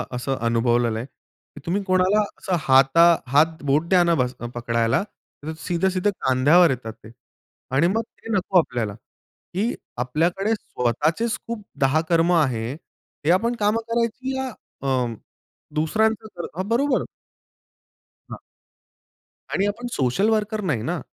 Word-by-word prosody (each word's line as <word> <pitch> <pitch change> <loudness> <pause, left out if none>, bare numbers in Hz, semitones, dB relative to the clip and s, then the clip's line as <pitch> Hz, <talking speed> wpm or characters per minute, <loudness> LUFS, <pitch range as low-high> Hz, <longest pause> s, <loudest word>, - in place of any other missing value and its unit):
असं 135 +2 -2
अनुभवलेलं 120 0 +1
आहे 115 - -5
की 140 +2 -20
तुम्ही 185 +4 0
कोणाला 185 +2 +3 0.2
असं 190 -4 -1
हाता 135 +3 +5 0.2
हात 155 +5 +2
बोट 145 +4 +2
द्या 180 -2 +5
ना 170 -1 +3
बस 125 -3 0 0.2
पकडायला 115 +1 +1 0.4
तर 160 +2 -4
सीधे-सीधे 185 +3 0
खांद्यावर 145 +7 +5
येतात 115 -4 -3
ते. 110 - -12 0.6
आणि 140 +6 +3
मग 225 - +2
ते 225 +1 -11
नको 190 0 +1
आपल्याला. 120 -9 -2 0.6
की 210 +7 0 0.3
आपल्याकडे 175 - 0
स्वतःचेच 155 - -1
खूप 230 -3 -5 0.2
10 135 +4 +3
कर्म 170 0 +3
आहे 125 -8 +1
हे 155 0 -5
आपण 230 +7 +2
काम 210 +1 +2
करायची 235 +3 -1
या 265 0 -2 0.3
अं, 130 -4 0 0.6
दुसऱ्यांचं 220 +8 +1
कर 175 - -5
हां, 185 +1 -2
बरोबर. 255 +3 +2 1.3
हां. - - -7 1.1
आणि 195 - +1
आपण 235 +4 -4
सोशल 135 - +1
वर्कर 215 -1 0
नाही 150 - -1
ना. 170 +6 -2
170 Hz, 135 wpm, -23 LUFS, 130-205 Hz, 1.3 s, हाता